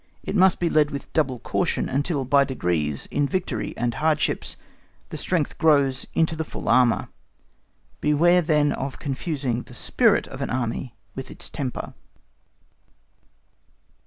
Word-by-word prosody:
It - - -3
must 190 -2 +5
be 175 - +1
led 155 -2 +3
with 140 -1 -7
double 135 -5 +1
caution, - - -1
until 140 0 -1
by 140 +2 +5
degrees, 85 - -1
in 145 0 +1
victory 150 - -3
and 120 0 0
hardships, 155 +4 0 0.5
the - - -6
strength 170 -6 -1
grows 140 -4 +3
into 160 0 +2
the 160 - -2
full - - -8
armour. 125 -1 +3 0.9
Beware 170 +4 +4
then 150 -3 +2
of 135 -1 -4
confusing 135 -3 -2
the 125 - -12
SPIRIT - - +2
of - - -8
an - - -2
Army 120 0 -3 0.2
with 130 - -7
its - - -7
temper. 135 -5 -4
140 Hz, 140 wpm, -24 LUFS, 125-155 Hz, 0.9 s, must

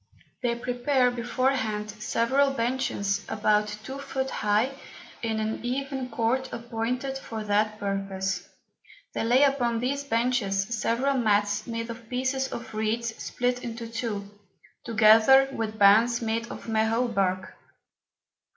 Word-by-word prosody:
They 235 -1 0
prepare 250 +1 +1
before 245 +2 0
hand, 215 -5 -2
several 260 +6 +2
Benches 230 -5 -1
about 210 0 +2 0.2
two 265 +4 -6
Foot 265 -1 -3
high, 215 +5 +1 0.5
in 225 -2 -1
an 220 +1 -3
even 265 +1 -3
Court 235 +3 0
appointed 245 +3 -3
for 225 -4 -6
that 210 +1 +1
purpose; 195 -2 -3 0.6
they - - -1
lay 245 +4 +4
upon 250 -4 +2
these 275 +4 -1
Benches 230 -6 0 0.2
several 255 +5 +1
Mats 205 -2 +1
made 230 0 -4
of 230 -1 -11
pieces 260 +1 0
of 235 - -7
Reeds 225 +1 -1
split 245 0 -1
in 230 -1 -5
two, 230 -3 -4 0.6
together 225 +5 +6
with 220 -4 -4
Bands 220 +4 +5
made 230 0 -2
of - - -8
Mahot 225 +2 +1
Bark. 185 -2 0
230 Hz, 130 wpm, -27 LUFS, 215-250 Hz, 0.6 s, together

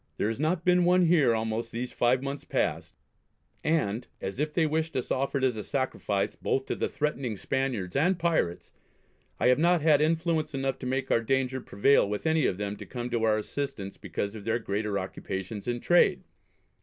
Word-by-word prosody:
There 105 - 0
has 115 - -4
not 160 +3 0
been 180 0 +4
one 180 0 +4
here 155 -9 +4
almost 110 +1 -2
these 120 +2 -4
five 125 +2 +2
months 140 0 -4
past; - - -2 0.7
and, 125 -8 0
as 95 +6 -5
if 150 +1 0
they 160 +1 +2
wished 160 0 -1
us 130 - -2
offered 135 0 0
as 130 -3 +2
a 105 - -5
sacrifice 130 -7 -1
both - - -1
to - - -2
the - - -1
threatening 135 -7 -2
Spaniards 120 -8 -2
and 175 +6 +3
Pirates, 165 - 0 0.7
I - - +4
have 125 - +4
not 175 +1 +3
had 150 -2 +5
influence 160 -1 +1
enough 135 -1 -1
to 125 - -5
make 130 +1 -1
our 115 - +4
danger 130 +2 0
prevail 100 +1 +3
with 105 +6 -3
any 160 -3 +3
of 90 - -1
them 100 0 -3
to 105 - -9
come 125 -1 -5
to 120 -1 0
our 110 -1 +3
assistance 110 -3 -4
because 100 0 -4
of 110 -2 -8
their 115 +2 +1
greater 105 -2 -2
occupations 95 +2 -5
in 120 0 -1
trade. 175 +7 +3
130 Hz, 195 wpm, -28 LUFS, 110-155 Hz, 0.7 s, had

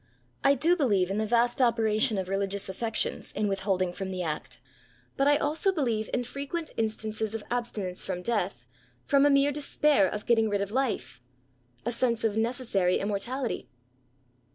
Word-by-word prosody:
I 275 0 +5
do 330 +7 +3
believe 200 - +2
in 200 - -1
the 220 - 0
vast 240 +3 +2
operation 220 -3 +3
of 190 -1 -2
religious 195 +1 0
affections 220 +4 0
in 210 - 0
with 195 -1 -1
holding 185 -2 0
firom 190 +1 -5
the 185 -1 -3
act: 155 -2 -4 0.6
but 275 - +2
I 290 0 +5
also 310 +8 +1
believe 235 - -1
in 245 - 0
frequent 280 +6 -5
instances 220 0 -2
of 220 - -5
abstinence 215 -7 -3
from 180 -2 -4
death, 195 - -2 0.4
from 280 0 +4
a - - +4
mere 280 0 +4
despair 290 -6 +2
of 210 +3 -5
getting 225 -2 +3
rid 205 -1 0
of 200 0 -3
life 175 - -2 0.3
— 125 +3 -37
a 240 - 0
sense 235 -1 0
of 220 -2 +1
necessary 220 -6 +1
immortality. 210 - -3
220 Hz, 175 wpm, -28 LUFS, 195-255 Hz, 0.6 s, I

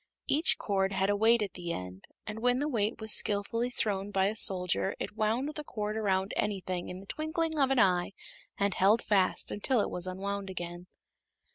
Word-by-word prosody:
Each 310 +5 +2
cord 195 -1 0
had 195 +1 +1
a - - +1
weight 220 +2 +4
at 200 - -5
the 175 -2 -5
end, 90 - -7 0.2
and 210 +1 -6
when 245 +2 +2
the 290 +3 -1
weight 225 -5 -1
was 220 -1 +3
skillfully 220 +4 +2
thrown 205 -5 -2
by 195 -1 +2
a 215 - -4
soldier 185 -1 +2
it - - -5
wound 230 +7 0
the 300 - -6
cord 210 -5 -4
around 195 -2 0
anything 185 -4 -2
in 180 +1 -7
the - - -13
twinkling 315 - -2
of 270 -2 +3
an 270 - +1
eye 185 -4 +3 0.4
and 200 -1 +1
held 205 +6 +3
fast 195 -3 +1
until 240 +4 +1
it - - 0
was 180 +1 -2
unwound 195 +1 -4
again. 175 -1 -6
205 Hz, 195 wpm, -30 LUFS, 190-230 Hz, 0.4 s, weight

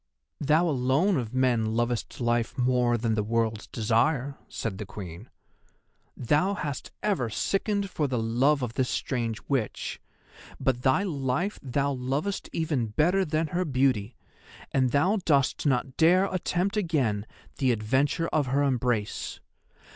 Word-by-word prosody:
"Thou 155 +4 +3
alone 140 +7 +2
of 115 -4 -3
men 120 -4 +1
lovest 120 0 -1
life 120 -1 0
more 125 -1 +2
than 115 0 0
the 110 - +1
World's 110 0 -1
Desire!" 125 +5 +1
said 105 -4 -4
the 105 - -4
Queen. 95 +1 -9 0.9
"Thou 150 - +2
hast 145 -8 -4
ever 180 - 0
sickened 200 - 0
for 150 -4 0
the 130 -2 -1
love 125 +5 +2
of 120 -2 -3
this 130 -1 0
strange 115 -4 -2
Witch, 130 -7 -2 0.6
but 125 -2 0
thy 130 +9 +3
life 150 +2 -1
thou 140 +2 0
lovest 140 +9 -2
even 150 -8 -1
better 170 - +2
than 155 -1 -1
her 180 +3 0
beauty, 130 - +1 0.6
and 130 -2 +2
thou 180 - +2
dost 140 -1 +2
not 130 -1 0
dare 180 +4 +5
attempt 185 +2 0
again 135 - 0 0.3
the 130 -3 +3
adventure 135 +9 +1
of 150 -4 +1
her 140 +3 +2
embrace. 120 -6 -1
130 Hz, 140 wpm, -27 LUFS, 115-155 Hz, 0.9 s, dare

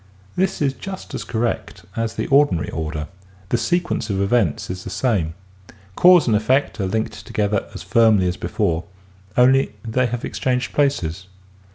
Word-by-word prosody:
This 190 -3 0
is 135 -2 +1
just 190 +5 -8
as - - -3
correct 110 -5 -3
as 115 -1 -2
the - - -2
ordinary 140 - +3
order. 75 -1 -4 0.4
The 120 - +2
sequence 175 -7 -1
of 95 -1 -1
events 100 -5 +1
is 90 0 -6
the - - -6
same. 95 -8 0 0.6
Cause 180 -2 +7
and 115 - +2
effect 125 +4 +1
are 95 - 0
linked 110 +3 -3
together 105 -2 -1
as 90 - -7
firmly 105 -1 +4
as 90 - -1
before, 85 -2 -1 0.5
only 130 -1 +4
they 125 +3 +1
have 120 0 -4
ex - - -6
changed 125 -1 0
places. 100 - 0
110 Hz, 165 wpm, -21 LUFS, 95-130 Hz, 0.6 s, Cause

